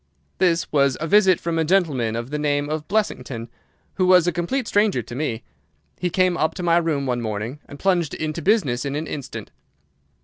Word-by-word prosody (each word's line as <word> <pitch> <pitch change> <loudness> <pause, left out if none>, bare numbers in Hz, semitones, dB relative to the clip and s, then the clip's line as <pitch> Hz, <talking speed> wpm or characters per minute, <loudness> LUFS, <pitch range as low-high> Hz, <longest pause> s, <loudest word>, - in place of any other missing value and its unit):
"This 175 -3 +2
was 140 -3 +2
a 160 - -2
visit 190 0 +4
from 165 -1 -2
a - - +3
gentleman 150 - +1
of 120 +3 -5
the 150 - -2
name 145 -1 0
of 155 -1 -3
Blessington, 125 - -2 0.4
who 185 - +1
was 180 -2 +6
a 175 - +2
complete 180 - -2
stranger 205 - +2
to - - -10
me. 125 -4 -3 0.6
He 180 - 0
came 185 0 +2
up 155 - 0
to 180 - -5
my 170 -1 +4
room 160 -5 0
one 125 -2 -1
morning, 110 +5 -4
and 145 - -10
plunged 175 -3 +1
into 155 +1 -3
business 150 - +2
in 140 0 -3
an 155 +2 -2
instant. 140 -4 -7
155 Hz, 200 wpm, -22 LUFS, 140-180 Hz, 0.6 s, was